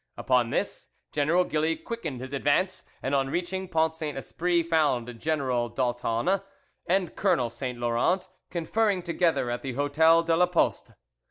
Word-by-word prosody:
Upon 125 -2 +2
this, - - -2 0.2
General 155 +5 +2
Gilly 160 -1 0
quickened 160 - -6
his 130 +2 -7
advance, 185 +7 +1 0.2
and 135 - -1
on 135 -1 +2
reaching 180 +4 -2
Pont 160 -2 +1
Saint 155 -3 -5
Esprit 170 +5 0
found 135 -8 0
General 130 -6 0
d'Aultanne 120 - 0 0.5
and 185 -1 +1
Colonel 130 - +1
Saint 125 +1 -5
Laurent 120 +11 +1 0.2
conferring 185 +3 0
together 170 -7 +1
at 120 - -3
the 135 -2 -4
Hotel 160 +5 +4
de 165 0 +2
la 180 +2 +4
Poste. 175 -1 0
155 Hz, 150 wpm, -27 LUFS, 125-175 Hz, 0.5 s, Hotel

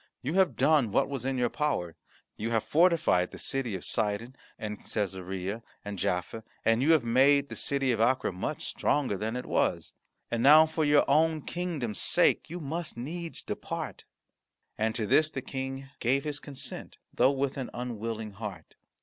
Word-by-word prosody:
You 145 +5 -2
have 190 -1 +3
done 145 -9 +3
what - - +2
was 135 -2 -4
in 135 -1 -1
your 120 -1 +1
power. 135 - -1 0.4
You 110 +2 -3
have 115 -2 +1
fortified 160 - +3
the - - -10
city 130 -6 -2
of 90 - -6
Sidon, 115 +3 -1 0.2
and 105 -1 -5
Cassarea, 95 +1 -3 0.2
and 100 -2 -5
Jaffa, 90 +6 -2 0.2
and 115 +1 +3
you 155 +5 +5
have 155 -6 +3
made 140 +4 +4
the - - -6
city 140 -2 0
of 115 -2 0
Acre 125 0 +2
much 90 0 -4
stronger 135 -8 0
than 110 +4 -3
it 125 - -4
was. - - 0 0.4
And 120 - 0
now 150 +5 +8
for 160 0 -2
your 145 -1 +4
own 155 +1 +3
kingdom's 160 -11 -3
sake, - - +3
you 175 +3 -5
must 160 -1 -4
needs 165 +7 -4
depart." - - -5 0.7
And 110 +1 -1
to 110 - -1
this 155 +9 +4
the 135 -4 -5
King 135 0 -5
gave 135 +4 +1
his 150 -1 -2
consent, 140 -3 -5 0.2
though 125 - +4
with 140 -1 -1
an 130 - -4
unwilling 115 -3 -4
heart. 100 -5 -8
130 Hz, 175 wpm, -29 LUFS, 110-145 Hz, 0.7 s, now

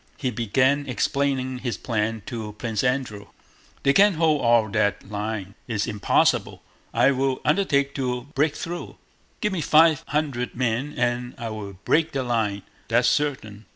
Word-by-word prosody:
He 130 -3 -2
began 130 +5 +1
explaining 130 0 -1
his 125 -2 -3
plan 110 -2 -2
to 110 -3 -6
Prince 110 -1 -3
Andrew. 125 -6 -1 0.6
"They 140 - +4
can't 200 +1 +5
hold 155 -2 +2
all 115 -2 +4
that 100 -1 0
line. 105 -1 -4
It's 110 -4 -1
impossible. 105 -3 +1 0.3
I 125 +4 +4
will 135 0 0
undertake 145 -4 +2
to 125 -2 -2
bweak 145 +2 +1
thwough. 170 +1 -6 0.4
Give 210 -4 0
me 175 - -1
five 155 0 +5
hundwed 140 -5 -2
men 125 +4 -1
and 120 0 -1
I 115 -1 -5
will 105 -2 -6
bweak 165 0 +2
the 135 -1 -1
line, 110 -5 -1 0.2
that's 120 +1 +3
certain! 110 -8 -2
125 Hz, 155 wpm, -24 LUFS, 110-140 Hz, 0.6 s, can't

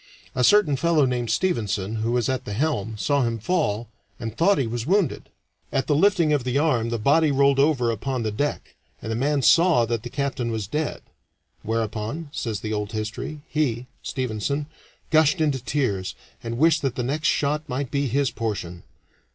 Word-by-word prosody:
A 125 - 0
certain 205 -4 +5
fellow 160 -1 +3
named 125 -2 -1
Stevenson, 110 - 0
who 110 +2 -1
was 120 -2 +1
at 130 -1 -1
the 105 - -5
helm, 110 -4 -1
saw 140 +6 +1
him 115 -2 0
fall, 115 - -1 0.3
and 115 -2 -5
thought 195 +9 +3
he 135 - +1
was 115 +2 -4
wounded. 190 -5 +1 0.4
At 135 -1 0
the 150 - +1
lifting 170 -1 +3
of 145 -4 +1
the 125 +2 0
arm 130 -7 +2
the 115 - -1
body 150 +8 +3
rolled 140 0 +3
over 135 -5 +3
upon 125 +3 -2
the 110 - -1
deck, 145 +8 -3 0.3
and 110 - -5
the - - -1
man 140 +3 +1
saw 165 -7 +5
that 115 -1 -2
the 120 - -7
captain 135 -3 -2
was 110 -2 -2
dead. 150 +9 -3 0.6
"Whereupon," 115 +7 -3
says 110 -7 -3
the 110 0 -3
old 105 +1 -3
history, 110 +8 -4
"he" 130 -6 -1 0.2
[Stevenson] 130 +3 -2 0.5
"gushed 160 +2 +4
into 145 -5 0
tears, 105 -11 -1 0.3
and 115 0 -4
wished 160 +3 +4
that 135 -3 -1
the 125 - -2
next 150 +5 -1
shot 150 +2 0
might 130 0 -3
be 140 -1 0
his 135 +1 +1
portion." 100 -7 -4
130 Hz, 185 wpm, -24 LUFS, 115-150 Hz, 0.6 s, certain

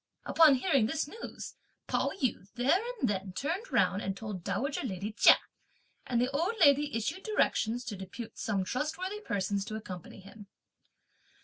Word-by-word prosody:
Upon 315 -4 +6
hearing 265 -5 +2
this 310 +3 -1
news, 445 +9 -8 0.3
Pao - - 0
yü 205 -5 -1
there 270 +10 +3 0.2
and 255 - +2
then 195 -2 -2
turned 355 - -3
round 200 - +2
and 195 0 -3
told 205 -5 -6
dowager 275 +8 -1
lady 205 -4 -4
Chia; 225 - +7 0.7
and 240 -2 +1
the 250 +2 +1
old 335 +11 0
lady 290 -4 +5
issued 225 - -3
directions 245 - 0
to 210 - -4
depute 195 +5 -8
some 200 -3 0
trustworthy 330 - -3
persons 200 - -1
to 215 -1 -5
accompany 185 -4 -8
him. 200 +2 -13
240 Hz, 155 wpm, -31 LUFS, 200-295 Hz, 0.7 s, Chia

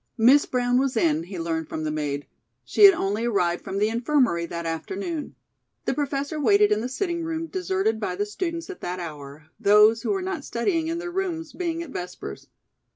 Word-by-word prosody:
Miss 255 +6 +6
Brown 245 0 +1
was 265 -3 0
in, 160 -4 +2
he 185 +1 -7
learned 165 -1 -2
from 155 - -4
the 155 - -1
maid. 145 -2 -3 0.4
She 415 - +6
had 390 -2 +9
only 210 -2 -1
arrived 175 -7 +1
from 195 - -4
the 210 +2 +2
Infirmary 235 - +1
that 170 0 -5
afternoon. 195 - -4 0.5
The - - +1
Professor 285 +1 -2
waited 210 -5 +4
in 210 +1 +2
the 245 - -3
sitting 340 +4 -2
room 325 0 -3
deserted 375 - -1
by 185 -4 -2
the 205 +2 -1
students 335 - -4
at 375 - -11
that 180 +1 -4
hour, 150 -2 -8
those 210 +1 +6
who - - -3
were 390 -2 0
not 370 -6 -3
studying 320 +8 -1
in 330 +1 -2
their 350 +1 -5
rooms 350 -3 -3
being 335 -2 -2
at 315 - -10
Vespers. 180 - -7
230 Hz, 200 wpm, -25 LUFS, -, 0.5 s, had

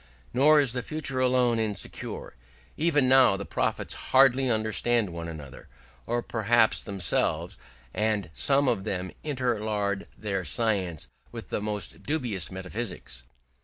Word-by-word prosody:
Nor 150 +5 +6
is 135 -5 +2
the 125 - -1
future 135 -1 -2
alone 125 -2 +3
insecure: 105 -3 -4 0.4
even 150 -4 +2
now 130 -6 +6
the 100 - -6
prophets - - -1 0.2
hardly 130 0 +5
understand 110 -1 +1
one 85 0 -6
another, 75 -6 -9 0.4
or 120 +1 -1
perhaps 115 0 +2
themselves; 95 -5 0 0.4
and 105 -5 -1
some 140 - +3
of 95 - +1
them 95 -1 -3
interlard 110 -8 -1
their 100 -3 -2
science 95 -7 0 0.2
with - - -8
the - - -2
most 105 -3 -4
dubious 120 - -1
metaphysics. 95 - -6
110 Hz, 130 wpm, -27 LUFS, 95-130 Hz, 0.4 s, Nor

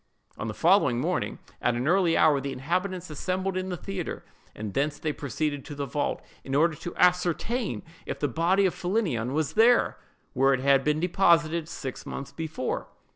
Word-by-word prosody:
On - - -5
the 110 - -4
following 165 -9 +4
morning, 170 +6 -1 0.2
at 120 - +2
an 125 +3 -1
early 175 -1 +3
hour, 145 -3 +4
the 140 +1 -3
inhabitants 180 +6 -2
assembled 185 +5 -2
in 185 0 -2
the 180 - -3
theatre, 190 -1 -5 0.3
and 105 -2 -5
thence 145 +1 0
they 155 -1 -2
proceeded 145 0 -3
to 145 - -7
the 140 0 -3
vault, 145 +2 -2 0.2
in 135 - -3
order 160 +3 +4
to 170 +3 -7
ascertain 180 +6 +1 0.2
if - - -3
the 145 - +1
body 175 +8 +2
of 185 - +2
Philinnion 175 - -1
was 155 -1 -1
where 230 +2 +4 0.6
it - - -4
had 135 0 +4
been 150 +1 +1
deposited 170 -2 +2
six 135 -6 -6
months 140 0 -6
before. 155 -3 -3
160 Hz, 180 wpm, -27 LUFS, 140-180 Hz, 0.6 s, following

